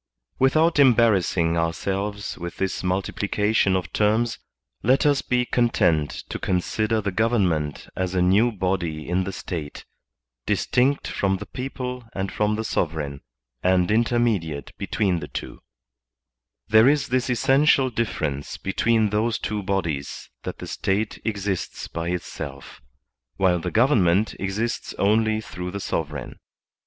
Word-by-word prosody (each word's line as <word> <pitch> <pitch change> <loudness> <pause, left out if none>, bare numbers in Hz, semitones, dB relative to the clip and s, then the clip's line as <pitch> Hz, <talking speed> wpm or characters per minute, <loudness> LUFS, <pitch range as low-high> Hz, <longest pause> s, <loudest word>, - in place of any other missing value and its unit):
Without 155 +5 +3
embarrassing 105 -10 +4
ourselves 100 +5 -2
with 85 -1 -7
this 95 -1 -2
multiplication 100 +2 +1
of 90 -2 -3
terms, 110 +2 +1 0.4
let 130 +7 +3
us 145 -2 +3
be 125 -1 +1
content 90 -12 +1
to - - -4
consider 110 +4 0
the 100 -1 -2
government 90 -9 0
as 95 0 -2
a 90 - +2
new 100 +7 +4
body 90 -6 -2
in 90 +2 0
the 95 - -3
State, 80 -6 -6 0.6
distinct 135 +3 +1
from 95 -1 0
the - - -7
people 125 -1 -5
and 95 0 -2
from 105 0 +1
the 110 - -2
sovereign, 75 -8 -2 0.4
and 90 0 +2
intermediate 110 - 0
between 95 -5 0
the - - -6
twa - - -7 1.1
There 110 +4 +6
is 145 -1 +1
this 125 +1 0
essential 135 +1 +3
difference 80 - -2
between 110 +2 +1
those 110 +2 +1
two 105 -1 -3
bodies, 85 -8 -3
that - - -6
the - - -7
State 100 +3 -2
exists 100 -4 -3
by 85 +1 -4
itself, 90 -7 -6 0.6
while 90 -2 +3
the - - -3
govern 115 -2 +4
ment 90 +5 +2
exists 105 +5 -2
only 110 +2 +2
through 90 -4 -6
the 100 +2 -5
sovereign. 75 -7 -4
100 Hz, 135 wpm, -24 LUFS, 90-115 Hz, 1.1 s, There